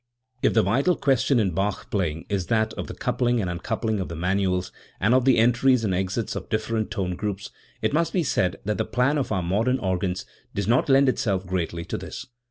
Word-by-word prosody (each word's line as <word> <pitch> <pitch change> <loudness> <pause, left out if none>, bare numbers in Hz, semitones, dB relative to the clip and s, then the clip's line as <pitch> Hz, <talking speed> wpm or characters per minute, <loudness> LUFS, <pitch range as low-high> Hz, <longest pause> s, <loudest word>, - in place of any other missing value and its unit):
If - - +2
the 110 - +5
vital 135 - +2
question 135 -1 +2
in 100 -4 +1
Bach 95 +4 -2
playing 80 -5 -1
is 100 -3 -2
that 110 -1 +1
of - - -5
the - - -7
coupling 120 -1 0
and 95 - -1
uncoupling 105 +5 -2
of 95 - -3
the 85 - -5
manuals, 90 +1 0 0.3
and 105 +6 +3
of 130 -1 +3
the 130 - +5
entries 120 +2 +4
and 100 -4 0
exits 95 +5 -2
of - - -6
different 110 0 -1
tone 95 -5 -2
groups, 100 0 -4 0.3
it - - +1
must 165 +2 +1
be 180 - +1
said 90 - 0
that 105 +1 -1
the - - +2
plan 135 +4 +1
of 135 - -2
our 95 -4 0
modern 110 +9 +1
organs 95 -2 -2 0.3
does 100 -1 -1
not 120 +5 +2
lend 135 +1 +5
itself 100 -8 0
greatly 85 -2 -3
to - - -4
this. - - -7
105 Hz, 215 wpm, -25 LUFS, 95-120 Hz, 0.3 s, the